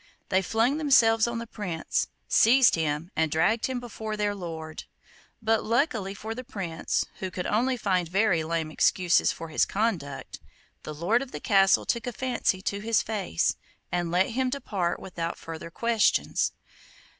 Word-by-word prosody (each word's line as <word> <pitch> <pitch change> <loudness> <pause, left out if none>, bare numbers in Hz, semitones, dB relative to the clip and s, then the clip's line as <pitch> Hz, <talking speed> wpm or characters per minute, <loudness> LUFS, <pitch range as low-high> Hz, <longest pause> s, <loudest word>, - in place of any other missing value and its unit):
They 190 0 +3
flung 230 - +1
themselves 230 -7 +4
on 235 0 -3
the 230 - -4
Prince, 185 -8 -2 0.2
seized 250 +2 +5
him, 160 +1 -1
and 160 -1 +1
dragged 215 +9 +2
him 260 -1 -3
before 220 -3 -6
their 205 -1 0
lord; 160 -5 -7 0.6
but, 225 0 +2
luckily 225 -5 0
for 220 +3 -5
the 255 +2 -7
Prince, 190 -10 -2
who 190 - -3
could 180 0 -5
only 250 +4 +1
find 185 -5 0
very 185 -3 +2
lame 160 -1 -2
excuses 175 +2 +3
for 165 - -8
his 155 - +2
conduct, 190 -10 -2 0.4
the 155 - -7
lord 180 +10 +1
of 275 -1 -7
the - - -6
castle 195 -3 +4
took 235 0 -1
a 245 - -3
fancy 240 -7 -1
to 200 - -2
his 225 +1 +1
face, 200 - -1 0.3
and 175 -1 -1
let 180 +4 +2
him 260 +2 0
depart 205 -10 -2
without 170 -2 -5
further 165 0 -8
questions. 230 +5 +1
205 Hz, 165 wpm, -27 LUFS, 170-230 Hz, 0.6 s, seized